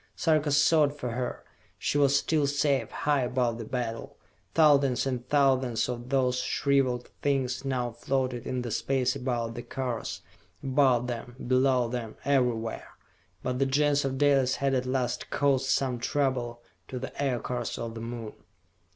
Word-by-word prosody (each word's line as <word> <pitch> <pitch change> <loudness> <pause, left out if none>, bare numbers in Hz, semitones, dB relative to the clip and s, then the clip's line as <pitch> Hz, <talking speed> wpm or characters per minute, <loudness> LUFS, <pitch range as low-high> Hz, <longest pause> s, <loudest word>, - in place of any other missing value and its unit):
Sarka 155 -2 +2
sought 145 0 +4
for 125 -4 -4
her. 125 +1 -4 0.3
She 145 - 0
was 140 0 +4
still 150 0 +1
safe, 140 -4 +1
high 145 -2 0
above 125 -2 0
the 115 - -5
battle. 115 -1 -4 0.4
Thousands 140 -5 +4
and 125 -2 -3
thousands 130 -5 +2
of 120 0 -5
those 130 -2 +2
shriveled 130 -2 0
things 135 -2 0
now 125 -3 -1
floated 130 0 -2
in 125 -1 -2
the 120 - -4
space 130 +2 0
about 120 -3 -2
the 120 - -6
cars, 125 -1 -4 0.4
above 130 -3 +3
them, 120 0 -5
below 130 -1 +3
them, 115 -2 -5
everywhere. 125 -5 0 0.5
But 125 0 -2
the 135 - +2
Gens 145 +1 +2
of 135 -1 -2
Dalis 135 -2 +3
had 140 -1 0
at 130 -1 0
last 130 -1 -1
caused 135 -2 +1
some 130 -2 +1
trouble 120 -3 -1 0.2
to 130 - -6
the 130 +1 -6
Aircars 125 -3 -2
of 115 -1 -5
the 115 - -7
Moon. 115 -2 -6
130 Hz, 155 wpm, -28 LUFS, 120-140 Hz, 0.5 s, sought